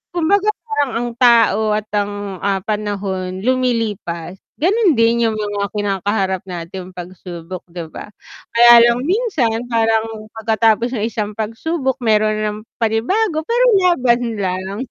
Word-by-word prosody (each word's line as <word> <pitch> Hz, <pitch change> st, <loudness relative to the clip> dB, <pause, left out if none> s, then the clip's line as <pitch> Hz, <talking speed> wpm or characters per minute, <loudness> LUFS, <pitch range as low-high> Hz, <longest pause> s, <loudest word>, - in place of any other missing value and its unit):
kumbaga 395 Hz, +5 st, +2 dB, 0.2 s
parang 285 Hz, -, 0 dB
ang 240 Hz, -, -2 dB
tao 225 Hz, -4 st, +4 dB
at 215 Hz, -, -4 dB
ang, 205 Hz, -1 st, -3 dB
ah, 195 Hz, -1 st, +1 dB
panahon 195 Hz, -3 st, -3 dB
lumilipas, 220 Hz, -9 st, -1 dB, 0.2 s
ganun 380 Hz, -, +3 dB
din 230 Hz, +1 st, +3 dB
yung -, -, -3 dB
mga 205 Hz, -1 st, -2 dB
kinakaharap 195 Hz, -1 st, -1 dB
nating 180 Hz, +1 st, -7 dB
pagsubok, 175 Hz, 0 st, -8 dB
'di 170 Hz, -1 st, -6 dB
ba? -, -, -8 dB, 0.4 s
Kaya 240 Hz, +1 st, +8 dB, 0.2 s
lang 235 Hz, +1 st, +1 dB
minsan, 305 Hz, -, 0 dB
parang 225 Hz, -1 st, 0 dB
pagkatapos 225 Hz, +1 st, +2 dB
ng 210 Hz, -, -1 dB
isang 210 Hz, -1 st, -3 dB
pagsubok 265 Hz, +6 st, -2 dB
meron 215 Hz, 0 st, +3 dB
na -, -, -3 dB
namang 215 Hz, +1 st, -10 dB, 0.2 s
panibago 310 Hz, -, +1 dB
pero 485 Hz, +2 st, +2 dB, 0.2 s
laban 250 Hz, -8 st, +3 dB, 0.2 s
lang. 190 Hz, +1 st, -3 dB
220 Hz, 135 wpm, -18 LUFS, 200-245 Hz, 0.4 s, Kaya